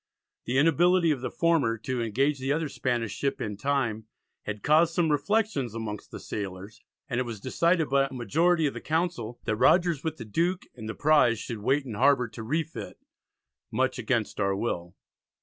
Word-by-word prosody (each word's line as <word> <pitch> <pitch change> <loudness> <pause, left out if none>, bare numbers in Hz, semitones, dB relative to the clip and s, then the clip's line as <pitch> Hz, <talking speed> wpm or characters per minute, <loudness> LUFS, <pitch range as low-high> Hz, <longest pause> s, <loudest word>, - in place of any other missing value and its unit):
The 125 - 0
inability 165 +3 +4
of 135 -5 -1
the 130 - -2
former 155 -9 +1
to 125 +3 -3
engage 135 +6 +1
the 135 +1 -1
other 155 0 0
Spanish 120 -6 -1
ship 140 +4 -2
in 105 -2 -3
time 115 -3 -1 0.4
had 105 -1 -5
caused 160 +2 +4
"some 165 -3 +2
reflections 150 - 0
amongst 110 -2 -5
the - - -8
sailors," 100 +1 -6 0.3
and 120 - -1
it - - +1
was 115 -4 -6
decided 165 - +1
by 135 0 +2
a - - -21
majority 160 - +2
of 140 - 0
the - - -7
Council 160 -8 -2
that 110 -1 -1
Rogers 170 +1 +3
with 160 -1 -3
the 115 - -7
Duke 175 - 0
and 110 -3 -8
the 115 - -4
prize 145 -6 +4
should 115 +1 -6
wait 135 +6 +1
in 120 - -6
harbour 130 +2 +3
to 115 - -9
refit 155 +8 -3 0.7
much 130 -1 0
"against 115 -2 -1
our 100 -1 +1
will." 90 -4 -3
130 Hz, 185 wpm, -27 LUFS, 115-160 Hz, 0.7 s, inability